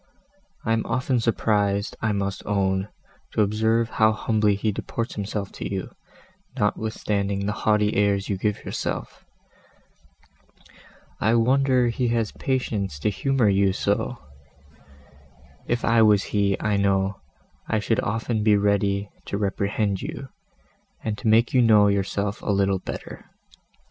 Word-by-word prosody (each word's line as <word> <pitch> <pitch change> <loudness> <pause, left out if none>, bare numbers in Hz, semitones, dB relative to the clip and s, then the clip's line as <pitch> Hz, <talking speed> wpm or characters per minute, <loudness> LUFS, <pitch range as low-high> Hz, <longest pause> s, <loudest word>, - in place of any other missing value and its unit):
I 115 - +2
am 115 - +1
often 125 +1 0
surprised, 105 -3 0
I 110 - +1
must 100 -1 -2
own, 95 -1 0 0.5
to 110 - +3
observe 110 +3 +1
how 110 0 +3
humbly 110 -2 +1
he 105 +2 -1
deports 115 +4 -4
himself 100 -1 -4
to - - -6
you, 95 -2 -4 0.7
notwithstanding 105 -2 -1
the 105 - 0
haughty 105 0 +1
airs 100 -1 +1
you 100 - -1
give 105 +2 -2
yourself; - - -4 2.0
I 110 +2 +2
wonder 130 +1 +3
he 120 +1 -1
has 115 -2 0
patience 105 - -2
to 80 +8 0
humour 135 +2 +1
you 100 -1 +3
so: - - -1 1.5
if 120 0 0
I 115 0 +4
was 105 -2 +5
he, 100 -2 0
I 105 -2 0
know, 100 0 +1 0.5
I 110 - +1
should 105 +1 0
often 110 +1 -1
be 105 -1 +5
ready 100 0 +1 0.2
to 100 - -2
reprehend 100 0 -1
you, 130 +2 -6 0.7
and 110 0 -4
make 115 +1 +3
you 130 - +5
know 105 -3 +5
yourself 100 +1 -1
a - - -5
little 100 -1 +2
better. - - -8
105 Hz, 135 wpm, -24 LUFS, 100-115 Hz, 2.0 s, was